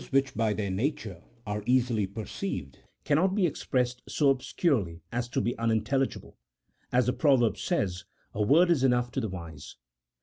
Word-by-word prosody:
113 135 - 0
which 135 0 -6
by 110 -1 +1
their 105 -2 -2
nature 100 - -2 0.2
are 105 0 -3
easily 120 -5 +2
perceived 100 - -5 0.2
cannot 175 +6 +2
be 200 -4 +3
ex 160 - -3
pressed 125 -1 0
so 145 -3 +3
obscurely 125 - -1
as 120 0 -2
to 135 - -1
be 120 -1 -1
unintelligible; 115 +4 -1 0.5
as 125 0 +3
the 125 - +1
proverb 130 -7 +3
says, 100 - -2
" - - -40
a 110 - -2
word 165 - +5
is 145 -6 +2
enough 125 -2 +2
to 135 - -2
the 110 - -2
wise." 85 -5 -9
120 Hz, 175 wpm, -28 LUFS, 105-135 Hz, 0.5 s, word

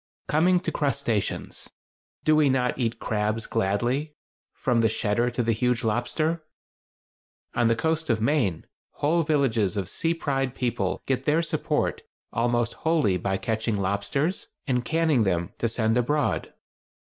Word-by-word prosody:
Coming 175 +4 +3
to 165 - -2
crustaceans—do 135 - -2
we 150 -2 +4
not 125 -1 +1
eat 115 -2 0
crabs 110 +1 -1
gladly, 120 +10 -1 0.4
from 125 -4 +1
the 110 - +3
"shedder" 110 +3 +1
to 120 0 -1
the 115 - +1
huge 125 +2 +1
lobster? 155 +9 0 1.1
On 120 -1 +2
the 115 - +3
coast 160 +4 -1
of 115 -2 +2
Maine 115 - +1 0.3
whole 165 +4 +1
villages 125 - +1
of 95 -3 -1
sea 165 - -1
side 135 -3 -1
people 105 -7 -1
get 130 0 -1
their 155 +2 +3
support 165 - -1 0.3
almost 120 0 +1
wholly 155 - +2
by 95 +2 -1
catching 110 0 -1
lobsters 100 - -1 0.2
and 125 -2 0
canning 160 -6 +2
them 85 -4 -1
to 115 - +1
send 110 0 +1
abroad. 145 +5 0
120 Hz, 140 wpm, -26 LUFS, 110-150 Hz, 1.1 s, we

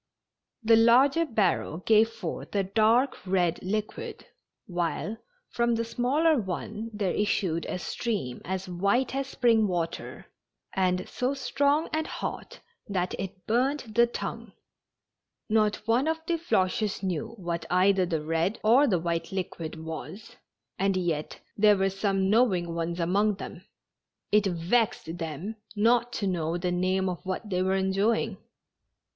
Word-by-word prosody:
The 225 0 +6
larger 270 +8 +5
barrel 195 - 0
gave 220 +4 +4
forth 225 -2 -6
a 200 - +2
dark 225 +7 +2
red 180 -2 +1
liquid, 210 +3 -4 0.4
while 175 +4 -2 0.3
from 235 0 +1
the 230 - 0
smaller 275 +6 +2
one 210 +3 -4
there 205 -4 -1
issued 180 -5 0
a - - -3
stream 195 - -3
as 190 +1 -4
white 200 +9 +1
as 270 0 -2
spring 230 -5 +3
water, 170 -3 -4 0.5
and 185 -1 +1
so 255 +3 -1
strong 285 +3 +1
and 315 +1 0
hot - - -6 0.3
that 185 -3 -1
it 190 -1 -6
burned 260 +6 +1
the 235 +2 +5
tongue. 235 - -6 1.0
Not 215 -1 +3
one 245 +6 +3
of 320 0 +1
the 335 -1 0
Floches 205 - 0
knew 205 +5 -3
what 170 -3 -4
either 185 +1 +3
the 160 -3 -2
red 165 +6 0
or 250 +7 +5
the 190 -8 +2
white 165 0 -2
liquid 170 -4 -4
was, 195 +9 -7 0.4
and 195 0 +2
yet 165 -4 -2 0.2
there 210 -1 +5
were 195 0 +1
some 195 0 0
knowing 190 -6 +2
ones 170 +1 -3
among 200 +5 +2
them. 190 -1 -9 0.7
It 210 -1 +4
vexed 175 -1 0
them 165 +7 -5 0.2
not 235 +3 +3
to 205 - -2
know 170 -3 -1
the 180 0 -1
name 185 +1 +1
of 180 -2 -4
what 190 +3 -4
they 180 0 +1
were 190 +1 +1
enjoying. 195 +4 +1
195 Hz, 145 wpm, -27 LUFS, 180-230 Hz, 1.0 s, The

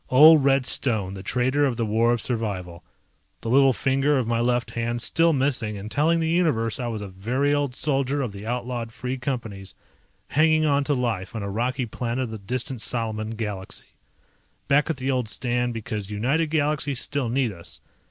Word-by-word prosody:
Old 150 +3 +8
Red 135 -1 +3
Stone, 110 -8 -1
the 95 - -7
Traitor 130 +7 +1
of 130 -5 +1
the 115 - 0
War 115 +2 +2
of 120 -1 0
Survival, 95 -8 -3 0.6
the 115 - -3
little 135 +1 +6
finger 135 +3 +1
of 130 - 0
my 115 0 0
left 120 +1 0
hand 120 0 -2
still 165 +7 +3
missing 130 -7 0
and 105 +2 -7
telling 165 +3 +2
the 160 - 0
Universe 150 -11 +1
I 120 - -2
was 110 -3 -4
a - - -6
very 120 +10 0
old 145 -3 0
soldier 140 -1 0
of 120 - -3
the 100 0 -9
outlawed 120 0 -3
Free 125 +3 -4
Companies 115 -7 -4 0.5
hanging 155 +1 +3
onto 145 0 +2
life 115 -5 -2
on 110 - -3
a 100 - -4
rocky 125 +5 -1
planet 120 +2 -3
of 120 - -5
the 110 - -6
distant 125 +4 -3
Salaman 110 -2 -3
galaxy. 105 -4 -5 0.7
Back 145 +2 +3
at 160 - -1
the 130 +1 -1
old 125 -4 -1
stand 120 +3 -1
because 105 -2 -4
United 130 +10 0
Galaxies 150 -3 +1
still 135 -3 0
need 125 -1 +1
us. 85 -4 -7
125 Hz, 190 wpm, -24 LUFS, 110-140 Hz, 0.7 s, Old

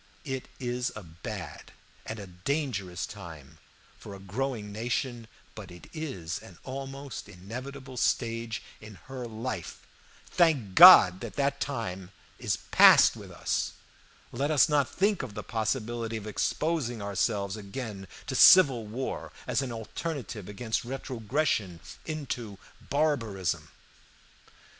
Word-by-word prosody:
It 130 -2 -4
is 125 -1 -2
a 105 - -7
bad 85 0 -8 0.3
and 110 - -4
a 100 - -7
dangerous 100 - -3
time 75 -3 -11 0.4
for 100 - -9
a - - -11
growing 105 +2 -3
nation, 120 +2 -3 0.3
but 105 -4 -9
it 90 0 -13
is 115 - -5
an 90 - -14
almost 135 -3 -7
inevitable 130 +8 -8
stage 115 -2 -1 0.2
in 110 -1 -11
her 130 -2 -6
life. 110 -4 -6 0.4
Thank 150 - +2
God, 90 0 +10
that 140 +4 -2
time 95 -9 -4 0.3
is - - 0
past - - +8
with - - -10
us! - - -2 0.6
Let 140 +5 -1
us 150 -3 +5
not 145 -3 +2
think 200 0 +1
of 115 -6 -7
the 105 - -5
possibility 115 0 -2
of 110 - -8
exposing 125 +3 -1
ourselves 100 0 -1
again 105 -1 -7 0.2
to - - -4
civil 135 - +7
war 125 +5 -4
as - - 0
an 130 -3 -4
alternative 115 - -5
against 110 +2 -2
retrogression 125 - -2 0.3
into 125 -9 -4 0.3
barbarism. 115 - 0
115 Hz, 125 wpm, -29 LUFS, 100-135 Hz, 0.6 s, God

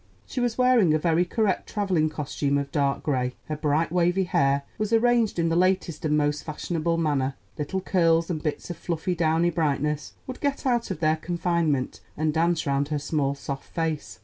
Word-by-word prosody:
She 260 - -5
was 240 -2 0
wearing 250 -11 +4
a - - +4
very 170 +2 +2
correct 210 0 0
traveling 185 -7 +1
costume 145 -1 -1
of 140 0 -3
dark 140 -2 0
gray; 125 -3 -1
her 155 - -1
bright 155 +2 0
wavy 180 +2 +2
hair 140 -5 +2 0.2
was 215 0 -1
arranged 230 -2 +3
in 165 -1 +1
the 165 - +1
latest 180 -3 +1
and 150 -1 +2
most 150 0 0
fashionable 165 +1 -2
manner; 140 -4 0 0.2
little 170 +6 -3
curls 165 -3 +2
and 160 -4 -3
bits 150 +2 -3
of 175 - -7
fluffy 170 +1 -2
downy 165 0 +2
brightness 150 -2 -1
would 255 - -7
get 285 -1 -1
out 240 -3 +1
of 155 - -4
their 155 0 +3
confinement 170 -5 -1 0.2
and 155 0 0
dance 165 +1 +1
round 140 0 +1
her 150 0 -1
small, 145 -1 -1
soft 140 -1 -7
face. 160 -3 -2
165 Hz, 190 wpm, -25 LUFS, 150-180 Hz, 0.2 s, wearing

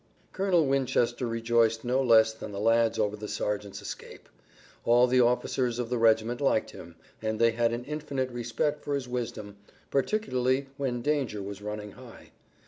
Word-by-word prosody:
Colonel 185 -4 +2
Winchester 130 -2 +1
rejoiced 115 0 +1
no 125 +2 +2
less 110 -3 +5
than 110 - -8
the 100 - -5
lads 115 +1 +3
over 105 -1 0
the 105 0 -7
sergeant's 105 -1 -3
escape. - - -9 0.5
All 120 +1 +5
the 125 0 +3
officers 125 0 +1
of 120 -1 -3
the 125 - 0
regiment 115 +2 +3
liked 135 -5 +1
him, 85 0 -12 0.3
and 110 0 -2
they 115 0 +5
had 115 0 +1
an 120 +1 -4
infinite 140 -4 -3
respect 120 +5 -2
for 145 - -1
his 135 -3 -3
wisdom, 115 -4 -5 0.3
particularly 135 - 0
when 130 -4 -2
danger 135 -9 -1
was 100 0 -7
running 105 0 -6
high. - - -14
120 Hz, 165 wpm, -28 LUFS, 110-130 Hz, 0.5 s, less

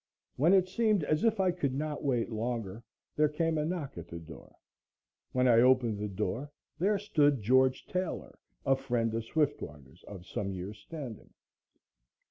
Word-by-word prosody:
When 165 +8 +4
it 185 -1 +5
seemed 210 -2 +2
as 155 +5 +1
if 225 -2 +2
I 185 -1 +3
could 145 -7 -2
not 150 +1 -3
wait 125 -4 0
longer, 115 -2 -3 0.3
there 150 0 +3
came 160 +1 0
a 150 - 0
knock 155 - -4
at 85 - -9
the 85 - -7
door. 80 -2 -12 0.8
When 130 0 +2
I 115 -2 +6
opened 125 -4 +4
the 105 - -2
door 110 +8 -3 0.3
there 200 +4 +3
stood 150 -9 +2
George 130 +3 +3
Taylor, 185 -1 -4 0.3
a 135 - +4
friend 120 -4 -1
of 115 0 -2
Swiftwater's 75 - -3
of 95 -4 -9
some 100 +1 -3
years' 95 +3 -6
standing. 130 -3 -8
130 Hz, 165 wpm, -31 LUFS, 110-160 Hz, 0.8 s, I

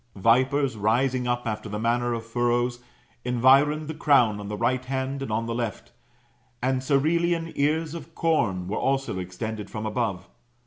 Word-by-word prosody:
Vipers 130 +5 +2
rising 125 +4 +1
up 120 0 -1
after 110 -1 -3
the 105 - -3
manner 120 +2 0
of 115 -1 -6
furrows, 120 +1 0 0.4
environed 135 +5 +4
the 160 - -4
crown 125 -9 +3
on 100 - -7
the 105 0 -4
right 125 +3 0
hand 135 +1 -3
and 135 - -4
on 115 +2 0
the 115 - -3
left, 115 -2 -4 0.7
and 130 +1 0
Cerealian 165 +5 +1
ears 155 +2 0
of 165 -1 -9
com 105 - +1
were 105 - -2
also 135 -7 0
extended 105 +4 -5
from 110 0 -5
above. 105 -4 -2
120 Hz, 165 wpm, -25 LUFS, 110-140 Hz, 0.7 s, environed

